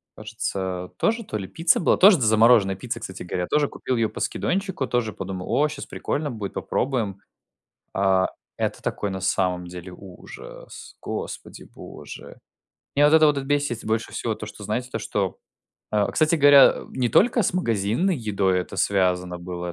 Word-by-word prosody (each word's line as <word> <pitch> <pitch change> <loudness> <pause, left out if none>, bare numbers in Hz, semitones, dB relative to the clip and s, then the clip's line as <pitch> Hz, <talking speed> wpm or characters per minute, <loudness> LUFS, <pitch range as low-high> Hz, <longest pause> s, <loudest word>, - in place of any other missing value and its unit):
кажется 95 -4 -4
тоже 230 +1 0
то 110 - -4
ли 95 - -6
пицца 165 - +2
была, - - +2
тоже 195 0 +7
д 130 - -2
замороженная 110 -2 +5
пицца, 115 +4 -5
кстати 95 -4 -7
говоря, 90 0 -3
тоже 150 -1 +2
купил 130 - -3
ее 115 -2 +1
по - - -9
скидончику, 190 -8 -2
тоже 120 -3 -1
подумал: 95 -1 -6
"О, 150 - +3
щас 150 -2 -7
прикольно 145 0 -3
будет 105 -4 -6
попробуем", 115 -8 -2 0.8
э 95 -1 +3 0.3
это - - -2
такой 100 - -2
на 95 - -4
самом 90 -1 0
деле 90 +1 -9
ужас, 90 0 -12
Господи - - -6
Боже. - - -11 0.6
Мне 145 - +4
вот 150 - +5
это 155 -1 +7
вот 150 -1 +2
бесит 145 -4 -1
больше 110 +1 -2
всего - - -2
то - - -8
что - - -11
знаете 125 +1 -3
то - - -2
что 100 -3 -2 0.5
э, 105 -1 +2
кстати 155 +1 +2
говоря, 145 -2 +8
э, - - -9
не 125 -2 -1
только 235 - +3
с - - 0
магазинной 120 - 0
едой 100 -6 0
это 90 - -8
связано 90 -2 0
было, 90 0 -6
110 Hz, 175 wpm, -24 LUFS, 95-145 Hz, 0.8 s, говоря